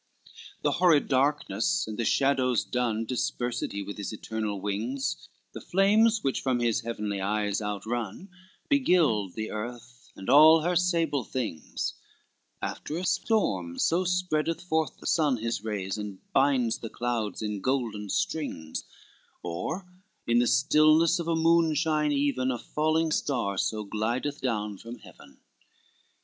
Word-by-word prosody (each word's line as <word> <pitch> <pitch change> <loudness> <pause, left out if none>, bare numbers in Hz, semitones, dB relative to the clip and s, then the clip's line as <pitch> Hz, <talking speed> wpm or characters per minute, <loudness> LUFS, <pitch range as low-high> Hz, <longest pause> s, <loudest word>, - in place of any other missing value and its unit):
LXII - - -19
The - - +2
horrid 170 -5 +4
darkness, 145 - +1
and 110 - -5
the 115 - -2
shadows 130 -3 +2
dun 115 -3 -1
Dispersed 120 0 -2
he 100 0 -4
with 100 +1 -7
his 100 - -4
eternal 110 -1 -4
wings, 110 +8 -3 0.2
The - - -7
flames 210 +4 +3
which 135 - 0
from 130 -2 0
his 115 -2 +1
heavenly 105 -4 -3
eyes 105 +1 0
outrun 105 - -4 0.4
Beguiled 165 - +2
the 110 0 -4
earth 120 +2 -7
and 95 - -10
all 155 +4 +8
her 175 +3 0
sable 165 -6 +1
things; 110 -10 -4 0.7
After 155 - -4
a 180 - -3
storm 95 - 0
so 175 +3 +2
spreadeth 170 -2 0
forth 160 -3 -1
the - - -15
sun 150 -6 +2
His 115 -2 -3
rays 105 -2 -3
and 105 -2 -6 0.2
binds 135 -4 +2
the 115 - -6
clouds 115 -4 -3
in 105 -2 -3
golden 115 -5 -1
strings, 85 - -3 0.6
Or 90 - -4 0.4
in 120 0 +3
the 120 - +3
stillness 155 +6 +4
of 170 - -4
a 165 - +1
moonshine 160 -2 +2
even 140 -2 +1
A 125 - -1
falling 155 +4 0
star 125 -10 0
so 105 +3 -1
glideth 120 +8 -2
down 105 -6 -2
from 115 +1 -9
Heaven. - - -17
125 Hz, 145 wpm, -28 LUFS, 105-155 Hz, 0.7 s, all